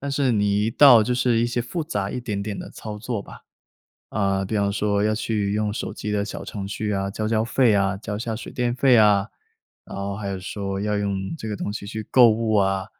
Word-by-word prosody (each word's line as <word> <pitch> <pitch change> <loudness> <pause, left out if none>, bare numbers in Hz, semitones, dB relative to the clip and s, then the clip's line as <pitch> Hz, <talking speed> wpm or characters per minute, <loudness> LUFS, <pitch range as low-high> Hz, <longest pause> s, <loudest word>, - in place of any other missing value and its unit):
但 140 0 -4
是 135 -3 +1
你 105 -1 +1
一 - - 0
到 130 -2 +8
就 125 +3 0
是 125 -2 +2
一 120 - +2
些 120 0 -1
复 155 +6 -4
杂 100 -9 -2
一 125 - -4
点 105 -4 -3
点 105 -1 -5
的 - - -7
操 105 -1 -8
作 115 -2 -4
吧， - - -13 0.7
呃， 100 -2 0
比 110 - -2
方 100 -1 +1
说 100 0 0
要 110 0 +2
去 105 -2 -1
用 105 0 0
手 - - -4
机 105 - -5
的 100 -1 0
小 105 - -7
程 100 -2 -6
序 105 +1 -3
啊， 100 0 -1
交 110 +2 -3
交 110 0 +1
费 115 -1 +3
啊， 100 -1 +1
交 105 0 -5
一 - - -6
下 115 -2 -3
水 120 - -8
电 125 -2 0
费 130 0 +4
啊， 105 -3 +5 0.6
然 - - -9
后 100 0 -3
还 100 -1 -5
有 95 -1 -3
说 100 +1 -4
要 105 0 -1
用 100 +4 -2
这 110 - -6
个 105 - -3
东 100 - -4
西 105 - -6
去 105 +1 -6
购 120 -3 +7
物 110 0 0
啊， 95 -2 +1
105 Hz, 270 characters per minute, -23 LUFS, 100-115 Hz, 0.7 s, 到